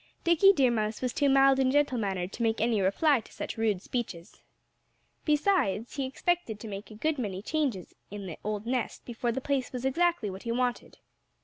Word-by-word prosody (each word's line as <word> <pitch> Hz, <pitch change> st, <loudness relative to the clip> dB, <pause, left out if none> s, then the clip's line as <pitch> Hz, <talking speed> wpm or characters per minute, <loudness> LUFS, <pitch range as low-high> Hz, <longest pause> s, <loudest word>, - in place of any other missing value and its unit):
Dickie 340 Hz, +3 st, +6 dB
Deer 270 Hz, -10 st, +3 dB
Mouse 215 Hz, -1 st, -1 dB
was 250 Hz, -1 st, -2 dB
too 285 Hz, -2 st, +2 dB
mild 270 Hz, 0 st, +5 dB
and 260 Hz, -1 st, +3 dB
gentle 285 Hz, -3 st, +2 dB
mannered 190 Hz, -3 st, -2 dB
to -, -, -7 dB
make 225 Hz, -1 st, +1 dB
any 225 Hz, -2 st, +2 dB
reply 270 Hz, -, +3 dB
to 220 Hz, -, -15 dB
such -, -, -5 dB
rude 215 Hz, -4 st, 0 dB
speeches. 195 Hz, -9 st, -5 dB, 0.8 s
Besides, 295 Hz, -, +1 dB
he 275 Hz, -2 st, -1 dB
expected 270 Hz, -5 st, -1 dB
to 225 Hz, -, -8 dB
make 200 Hz, 0 st, -7 dB
a 215 Hz, -, -11 dB
good 310 Hz, +6 st, -1 dB
many 200 Hz, -5 st, -3 dB
changes 265 Hz, -, -2 dB, 0.2 s
in 205 Hz, -1 st, -7 dB
the 170 Hz, -4 st, -7 dB
old 210 Hz, 0 st, -3 dB
nest 245 Hz, 0 st, -2 dB
before 240 Hz, 0 st, -2 dB
the 265 Hz, -, -3 dB
place 270 Hz, -2 st, -1 dB
was 250 Hz, 0 st, -5 dB
exactly 335 Hz, -, +1 dB
what 190 Hz, +1 st, -8 dB
he 230 Hz, -, -3 dB
wanted. 245 Hz, 0 st, -2 dB
240 Hz, 200 wpm, -29 LUFS, 210-275 Hz, 0.8 s, Dickie